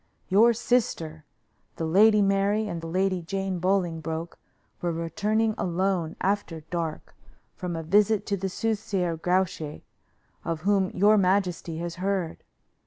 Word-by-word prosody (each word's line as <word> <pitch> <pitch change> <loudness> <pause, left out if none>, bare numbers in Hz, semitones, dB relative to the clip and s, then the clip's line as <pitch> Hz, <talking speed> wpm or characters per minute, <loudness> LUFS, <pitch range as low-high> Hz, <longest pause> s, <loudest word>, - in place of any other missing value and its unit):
Your 215 +5 +6
sister, 215 -10 -1 0.5
the 165 - -3
Lady 210 +5 +5
Mary, 200 +2 +2
and 170 -4 -5
Lady 185 +2 0
Jane 195 +1 -3
Bolingbroke 170 -3 -1 0.4
were 175 - 0
returning 210 +7 0
alone, 180 -2 0
after 190 -5 -1
dark, 165 -3 -4 0.4
from 180 -2 -4
a 165 - -4
visit 205 +4 +3
to 200 - 0
the 195 0 -3
soothsayer 195 -4 -1
Grouche, 170 -3 -1 0.6
of 165 -2 -3
whom 195 0 +2
your 210 +2 +4
majesty 180 -3 0
has 170 +1 -5
heard. 185 -3 -2
185 Hz, 125 wpm, -26 LUFS, 165-200 Hz, 0.6 s, Your